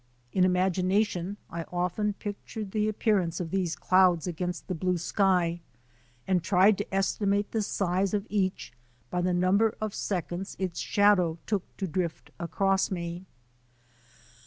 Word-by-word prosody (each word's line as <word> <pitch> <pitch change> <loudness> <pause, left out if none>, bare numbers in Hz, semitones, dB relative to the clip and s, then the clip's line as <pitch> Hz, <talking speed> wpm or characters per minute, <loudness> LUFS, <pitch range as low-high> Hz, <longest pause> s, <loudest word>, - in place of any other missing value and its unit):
In 185 - +4
imagination 185 +1 +1
I 170 0 -3
often 180 +4 0
pictured 205 0 -6
the 215 0 +1
appearance 195 -6 +1
of 170 -3 -4
these 180 -4 0
clouds 185 -3 +3
against 180 0 -4
the 185 - -2
blue 180 +1 0
sky 175 -1 +1 0.6
and 185 -2 +2
tried 190 +3 +4
to 205 - -4
esti 195 +2 0
mate 200 +1 +1
the 220 - 0
size 190 -1 0
of 200 0 -2
each 190 - -1 0.4
by 180 - 0
the 180 +1 +1
number 185 +5 +3
of 215 -2 -3
seconds 180 0 -3
its 185 -3 -3
shadow 195 -5 +3
took 205 -4 -3
to 195 - -2
drift 175 -1 -3
across 190 +3 +1
me. 175 0 -5
185 Hz, 145 wpm, -28 LUFS, 175-200 Hz, 0.6 s, In